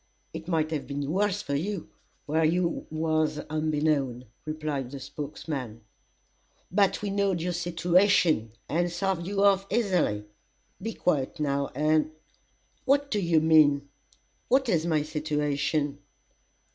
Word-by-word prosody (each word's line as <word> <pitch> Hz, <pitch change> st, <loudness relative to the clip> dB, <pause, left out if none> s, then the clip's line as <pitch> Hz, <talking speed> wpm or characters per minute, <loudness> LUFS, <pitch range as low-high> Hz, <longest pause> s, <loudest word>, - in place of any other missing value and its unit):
"It 160 Hz, -, -7 dB
might 160 Hz, -3 st, 0 dB
have 150 Hz, -3 st, -3 dB
been 140 Hz, 0 st, -3 dB
worse 205 Hz, +2 st, +1 dB
for 140 Hz, -, -3 dB
you, 175 Hz, +5 st, -3 dB, 0.3 s
where 160 Hz, +2 st, +1 dB
you 170 Hz, +2 st, +1 dB
was 155 Hz, -1 st, 0 dB
onbeknown," 150 Hz, -5 st, 0 dB, 0.2 s
replied 155 Hz, -4 st, -3 dB
the 140 Hz, +1 st, -7 dB
spokesman, 140 Hz, -4 st, -6 dB, 0.9 s
"but 200 Hz, +1 st, +2 dB
we 205 Hz, -, -1 dB
knowd 200 Hz, -3 st, +1 dB
your 175 Hz, +2 st, -2 dB
situation, 175 Hz, -, +2 dB
and 175 Hz, +2 st, 0 dB
sarved 175 Hz, -1 st, -1 dB
you 200 Hz, 0 st, 0 dB
off 195 Hz, -1 st, +4 dB
easily. 180 Hz, -, +1 dB, 0.6 s
Be 225 Hz, +3 st, -4 dB
quiet 150 Hz, -2 st, 0 dB
now, 140 Hz, -2 st, 0 dB
and 155 Hz, +2 st, +2 dB, 0.4 s
" -, -, -40 dB
"What 280 Hz, +1 st, +2 dB
do 210 Hz, -, +1 dB
you 170 Hz, -4 st, +3 dB
mean 145 Hz, -3 st, +4 dB, 0.6 s
what 265 Hz, 0 st, +3 dB
is 170 Hz, -4 st, +1 dB
my 155 Hz, -3 st, +2 dB
situation?" 150 Hz, -1 st, -1 dB
155 Hz, 135 wpm, -27 LUFS, 145-180 Hz, 0.9 s, off